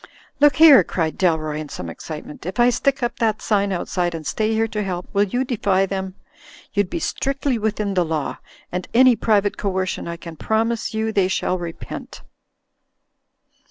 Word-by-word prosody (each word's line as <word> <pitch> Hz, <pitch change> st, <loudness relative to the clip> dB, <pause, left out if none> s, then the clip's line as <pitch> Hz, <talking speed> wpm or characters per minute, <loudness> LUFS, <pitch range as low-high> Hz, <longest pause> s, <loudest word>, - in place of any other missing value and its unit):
"Look 290 Hz, -2 st, +5 dB
here!" 305 Hz, -2 st, +8 dB
cried 160 Hz, -3 st, -2 dB
Dalroy, 155 Hz, -4 st, +1 dB
in 155 Hz, -1 st, -6 dB
some 90 Hz, -, -6 dB
excitement, 150 Hz, -, -8 dB
"if 190 Hz, -, -5 dB
I 240 Hz, +1 st, +5 dB
stick 275 Hz, +1 st, 0 dB
up 240 Hz, -, -2 dB
that 220 Hz, -3 st, +1 dB
sign 200 Hz, -2 st, +1 dB
outside, 175 Hz, -1 st, -1 dB
and 160 Hz, -1 st, -7 dB
stay 215 Hz, +6 st, 0 dB
here 225 Hz, 0 st, +1 dB
to 210 Hz, -1 st, -3 dB
help, 180 Hz, -3 st, -4 dB
will 200 Hz, 0 st, +3 dB
you 245 Hz, +6 st, -1 dB
defy 200 Hz, -6 st, +1 dB
them? 190 Hz, -1 st, -4 dB, 0.6 s
You'd 205 Hz, -4 st, +1 dB
be -, -, -3 dB
strictly 275 Hz, -5 st, -1 dB
within 210 Hz, -1 st, -1 dB
the 180 Hz, -2 st, +2 dB
law, 160 Hz, -3 st, -3 dB, 0.3 s
and 180 Hz, +1 st, -3 dB
any 255 Hz, 0 st, +7 dB
private 210 Hz, -2 st, +1 dB
coercion 190 Hz, -3 st, -2 dB
I 170 Hz, 0 st, -5 dB
can 165 Hz, -1 st, -10 dB
promise 225 Hz, +3 st, -1 dB
you 220 Hz, 0 st, 0 dB
they 195 Hz, -3 st, +2 dB
shall 185 Hz, -1 st, -1 dB
repent. 170 Hz, -1 st, -8 dB
200 Hz, 175 wpm, -21 LUFS, 175-225 Hz, 0.6 s, here